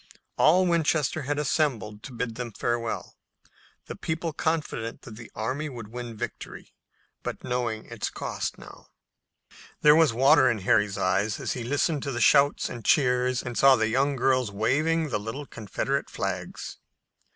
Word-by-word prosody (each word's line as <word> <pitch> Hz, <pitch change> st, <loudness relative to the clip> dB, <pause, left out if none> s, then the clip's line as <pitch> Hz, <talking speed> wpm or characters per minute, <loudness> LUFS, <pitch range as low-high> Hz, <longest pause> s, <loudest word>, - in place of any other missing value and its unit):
All 180 Hz, +4 st, +5 dB
Winchester 160 Hz, -3 st, +1 dB
had 145 Hz, -, 0 dB
assembled 130 Hz, -, -1 dB
to 135 Hz, -, -9 dB
bid 120 Hz, -1 st, -3 dB
them 120 Hz, -1 st, -6 dB
farewell, 120 Hz, +1 st, -3 dB, 0.7 s
the -, -, -7 dB
people 160 Hz, 0 st, -3 dB
confident 150 Hz, -8 st, -2 dB
that 110 Hz, -, -10 dB
the 115 Hz, +1 st, -11 dB
army 130 Hz, +8 st, -3 dB
would 115 Hz, -5 st, -8 dB
win 120 Hz, -1 st, -7 dB
victory, -, -, -7 dB, 0.5 s
but -, -, -6 dB
knowing 120 Hz, -3 st, -2 dB
its -, -, -4 dB
cost -, -, -4 dB
now. -, -, -14 dB, 0.9 s
There 150 Hz, 0 st, +7 dB
was 160 Hz, -4 st, +5 dB
water 135 Hz, +4 st, +5 dB
in 115 Hz, -4 st, -1 dB
Harry's 105 Hz, +1 st, +2 dB
eyes 100 Hz, +3 st, 0 dB
as -, -, -2 dB
he 125 Hz, -, -5 dB
listened 145 Hz, +4 st, 0 dB
to 140 Hz, -, -3 dB
the 120 Hz, -, -3 dB
shouts 140 Hz, +5 st, +4 dB
and 120 Hz, -2 st, -7 dB
cheers 125 Hz, -3 st, +2 dB
and 125 Hz, -1 st, -5 dB
saw 135 Hz, +1 st, +6 dB
the 110 Hz, -1 st, +1 dB
young 140 Hz, +4 st, +1 dB
girls 130 Hz, -2 st, +2 dB
waving 155 Hz, +10 st, +1 dB
the 110 Hz, -, -1 dB
little 115 Hz, +8 st, -6 dB
Confederate 120 Hz, +4 st, -3 dB
flags. -, -, -5 dB
125 Hz, 160 wpm, -26 LUFS, 115-145 Hz, 0.9 s, There